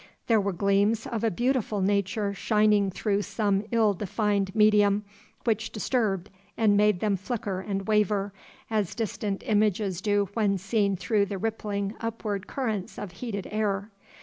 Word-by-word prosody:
There 225 -3 +3
were 200 0 -1
gleams 200 +4 +2
of 230 -1 -3
a 225 - +3
beautiful 240 0 0
nature 200 +1 0
shining 210 -1 +3
through 200 +2 0
some 205 -1 0
ill 225 -3 +3
defined 200 0 -1
medium 210 -1 +4 0.4
which 225 -1 0
disturbed 210 -4 -1 0.3
and 215 -2 +4
made 210 -2 +3
them 210 -2 +2
flicker 200 -1 -3
and 195 0 -4
waver, 210 -2 +1 0.4
as 210 -5 0
distant 210 -3 -3
images 205 -3 +1
do 205 -1 +1
when 205 -3 +1
seen 200 +1 +1
through 200 +2 +1
the 195 - -4
rippling 205 -1 -2
upward 215 -3 -3
currents 220 -8 -3
of 205 -3 -6
heated 200 0 -5
air. 210 -1 -1
205 Hz, 150 wpm, -27 LUFS, 200-220 Hz, 0.4 s, medium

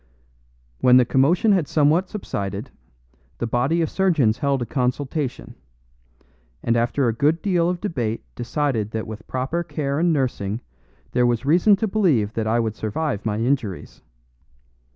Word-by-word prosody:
When 125 0 +6
the 125 - +5
commotion 165 - +3
had 180 -7 +2
somewhat 160 +5 +2
subsided, 105 - -5 0.7
the - - -2
body 135 +9 +1
of 160 - -1
surgeons 150 - +2
held 140 -2 0
a - - -4
consultation, 130 +3 -2 1.1
and 115 - +1
after 120 +3 +1
a 115 - +1
good 150 +7 +1
deal 175 -4 +2
of 180 -1 -2
debate 120 - -3
decided 120 -3 -1
that 110 0 -2
with 110 0 -9
proper 130 +7 -2
care 140 -3 -2
and 170 +1 +3
nursing 120 -7 -1 0.5
there 125 0 +2
was 120 +1 0
reason 175 +8 +5
to 220 +3 -1
believe 160 - +1
that 110 -1 -2
I 115 +2 +2
would 110 -2 -1
survive 110 0 -3
my 105 -1 -1
injuries. 115 -5 -2
130 Hz, 150 wpm, -22 LUFS, 115-165 Hz, 1.1 s, When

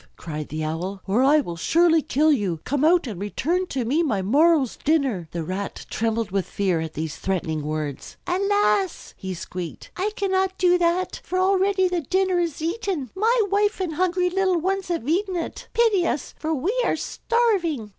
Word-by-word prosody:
cried 155 -2 -6
the 155 +1 -3
Owl, 175 +6 -3
"or 200 +6 +2
I 295 +3 +5
will 175 -10 -6
surely 330 - +3
kill 300 +3 +2
you. 200 - 0
Come 285 +1 -1
out 340 +1 +4
and 205 -7 -6
return 340 - -1
to 260 -6 -2
me 285 +8 +2
my 220 - 0
morrow's 290 - +3
dinner." 270 - 0
The 170 0 -4
Rat 190 +4 -5
trembled 225 -2 -1
with 195 -1 -1
fear 190 -4 0
at 160 -1 -6
these 160 0 -4
threatening 165 -5 -2
words. 150 -2 -5
"Alas!" 355 - +1
he 190 -1 -5
squeaked, 175 -1 -7
"I 385 +3 0
cannot 380 -1 0
do 360 -1 +4
that, 350 +2 0
for 370 - -3
already 380 0 +3
the 355 -1 -1
dinner 370 +4 +1
is 330 -3 -2
eaten. 340 - -2
My 455 +5 +2
wife 410 +1 +2
and 360 -4 -2
hungry 360 +2 +1
little 375 -1 +2
ones 385 +3 -1
have 335 -8 -3
eaten 370 +4 0
it. 335 - -5
Pity 430 -7 +3
us, 295 - -3
for 315 - -2
we 320 - 0
were - - +1
starving!" 370 - 0
315 Hz, 185 wpm, -24 LUFS, -, -, I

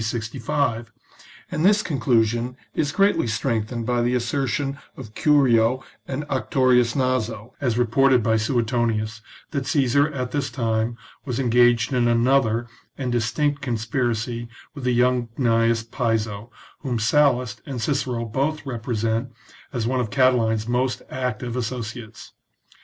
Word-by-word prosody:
65; 115 +1 -2 0.6
and 155 - -1
this 205 +2 +4
conclusion 120 -3 +1 0.2
is 145 -2 0
greatly 200 -7 +2
strengthened 115 0 -2
by 120 0 +1
the 120 +1 +1
assertion 135 +2 -1 0.2
of 110 -5 -9
Curio 130 -4 +3 0.2
and 135 +2 -3
Actorius 130 -3 +2
Naso, 125 -4 -1
as 120 -4 0
reported 125 +1 +3
by 110 +1 +2
Suetonius, 115 -1 0 0.3
that 140 -4 -3
Caesar 140 +1 +2
at 125 -3 -4
this 140 -2 -1
time 115 -1 -1 0.3
was 125 -2 -3
engaged 120 -1 +3
in 120 -1 +2
another 120 -1 +2 0.3
and 130 -3 -2
distinct 120 +5 0
conspiracy 120 -1 -2 0.2
with 140 -4 -7
the 125 - +2
young 125 0 +2
Gnaeus 115 -2 +2
Piso, 110 -3 -1 0.3
whom 125 -3 -2
Sallust 125 +1 +2
and 135 -3 -4
Cicero 125 -1 -1
both 140 +7 -1
repre 120 -3 -4
sent 115 +3 -1 0.4
as 120 -3 -2
one 130 +2 0
of 120 -3 -1
Catiline's 115 -2 +2
most 125 +1 0
active 125 -2 -3
associates. 115 -2 -5
120 Hz, 130 wpm, -23 LUFS, 115-130 Hz, 0.6 s, this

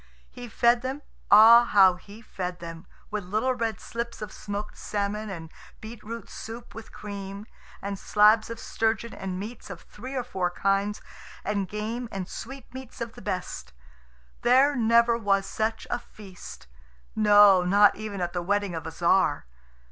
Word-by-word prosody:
He 245 -1 -9
fed 235 +2 +3
them 265 +3 -5 0.3
ah, 225 +3 +9
how 195 -5 +5
he 200 +5 -14
fed 180 -4 -5
them! 165 +1 -9 0.2
with 210 -1 -3
little 215 +8 0
red 225 -5 -2
slips 235 +3 -5
of 210 -2 -6
smoked 205 0 -6
salmon, 210 +1 -3
and 165 -4 -8 0.3
beetroot 225 +1 -8
soup 230 +2 -9
with 225 0 -10
cream, 200 0 -7 0.4
and 200 -1 -4
slabs 215 +1 +4
of 230 0 -6
sturgeon, 225 +1 -1
and 185 -1 -5
meats 215 +3 -8
of 185 -4 -8
three 255 +6 -9
or 255 - -1
four 190 -7 -2
kinds, 195 +3 -1 0.4
and 200 -2 -1
game 220 +4 -4
and 190 -2 -5
sweetmeats 260 +1 -9
of 230 -1 -5
the - - -12
best. 180 - -5 0.7
There 265 +4 +4
never 235 0 +3
was 195 -2 +1
such 220 +2 -2
a 240 - 0
feast 195 - -12 0.5
no, 205 -3 +6
not 200 +3 +5
even 210 -2 -6
at 175 0 -2
the 175 - -2
wedding 200 +1 -1
of 160 -1 -5
a - - -5
Tzar. 170 - +2
210 Hz, 160 wpm, -26 LUFS, 195-230 Hz, 0.7 s, ah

